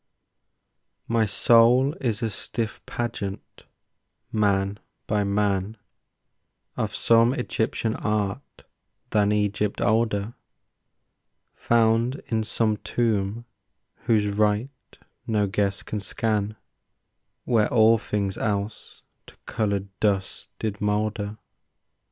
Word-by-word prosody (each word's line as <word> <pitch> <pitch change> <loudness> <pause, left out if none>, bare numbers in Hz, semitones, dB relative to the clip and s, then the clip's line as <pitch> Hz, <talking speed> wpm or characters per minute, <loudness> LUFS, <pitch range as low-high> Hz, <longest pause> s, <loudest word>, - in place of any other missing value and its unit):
My 115 -1 +2
soul 120 +6 +4
is 115 -4 -1
a 110 - 0
stiff 110 +2 -4
pageant, 110 -4 -5 0.7
man 100 -1 +1 0.3
by 105 -1 +1
man, 100 +1 0 1.0
Of - - -2
some 115 +2 +4
Egyptian 115 -2 -1
art 105 +3 -3 0.5
than 105 -1 +3
Egypt 105 0 0
older, 110 0 +1 1.2
Found 115 +2 +2
in 110 -1 0
some 110 -1 +1
tomb 110 0 -1 0.5
whose 110 -3 +1
rite 105 +6 -1 0.3
no 105 -2 +2
guess 100 0 -1
can 105 - -4
scan, 105 0 -1 0.9
Where 110 -4 +2
all 115 -1 +5
things 100 -2 -2
else 105 0 -3 0.2
to - - -16
coloured 100 -2 -1
dust 100 -3 -1
did 105 -2 -4
moulder. 105 0 -1
105 Hz, 95 wpm, -25 LUFS, 100-115 Hz, 1.2 s, all